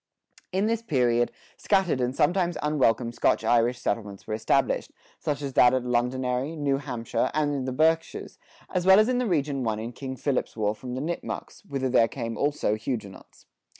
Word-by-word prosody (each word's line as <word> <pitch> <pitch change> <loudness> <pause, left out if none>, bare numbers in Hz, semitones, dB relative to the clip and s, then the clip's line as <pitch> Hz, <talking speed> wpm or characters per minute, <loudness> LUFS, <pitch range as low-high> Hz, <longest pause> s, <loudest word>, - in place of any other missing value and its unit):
In 190 +3 +1
this 225 0 0
period, 125 - +1 0.3
scattered 190 -9 +1
and 125 +1 -1
sometimes 175 +3 +1
unwelcome 125 -6 +2
Scotch - - +1
Irish 120 +1 +2
settlements 105 -3 -3
were - - -4
established, 115 +5 +1 0.3
such 145 -1 -2
as 135 -1 -4
that 125 0 +6
at 130 -1 -1
Londonderry, 125 +4 -1
New 140 -3 0
Hampshire, 125 -2 -2
and 150 -1 +1
in 135 -2 -2
the 130 - -2
Berkshires, 160 +4 0 0.3
as 180 -2 +1
well 190 0 +9
as 215 - +4
in 250 -1 +1
the 250 - 0
region 145 -6 0
won 110 -2 -1
in 115 +2 -5
King 130 +1 -6
Philip's 130 -3 -2
War 105 -1 +1
from 125 +3 -7
the 130 - -3
Nipmucks, 170 +6 -5
whither 135 -6 -2
there 120 -2 +4
came 115 -2 -5
also 145 -6 0
Huguenots. 110 -3 -6
130 Hz, 185 wpm, -26 LUFS, 120-155 Hz, 0.3 s, well